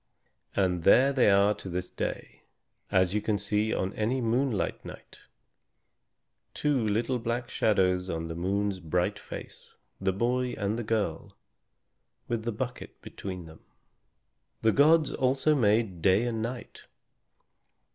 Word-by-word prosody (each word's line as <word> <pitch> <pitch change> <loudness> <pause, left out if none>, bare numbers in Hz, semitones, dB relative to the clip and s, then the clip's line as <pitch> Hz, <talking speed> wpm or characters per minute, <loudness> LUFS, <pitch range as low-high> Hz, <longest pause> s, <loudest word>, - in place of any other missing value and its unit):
And 90 -3 +1
there 135 +10 +5
they 130 -5 +4
are 100 +1 +4
to 100 -2 -9
this 90 +1 -4
day, - - -5 0.5
as 95 -1 +3
you 105 - 0
can 105 0 0
see 105 +2 0
on 95 +1 -1
any 115 +5 -1
moonlight 120 -1 0
night, - - -11 1.4
two 145 -5 +1
little 120 +4 0
black 120 +1 -3
shadows 95 -3 +1
on 80 -1 -3
the 80 - -5
moon's 95 +3 -1
bright 90 +1 -1
face, - - -10 0.2
the 95 0 +1
boy 125 +5 0
and 105 +2 -1
the - - -3
girl, 105 -7 -2 0.9
with 115 -1 -2
the 120 - 0
bucket 125 +3 -6
between 90 -3 -7
them. 80 0 -13 1.0
The 110 - +5
gods 155 +4 +4
also 135 +4 +2
made 105 - +1
Day 95 +6 +3
and 115 -2 -2
Night. 120 +2 -6
105 Hz, 135 wpm, -28 LUFS, 95-120 Hz, 1.4 s, there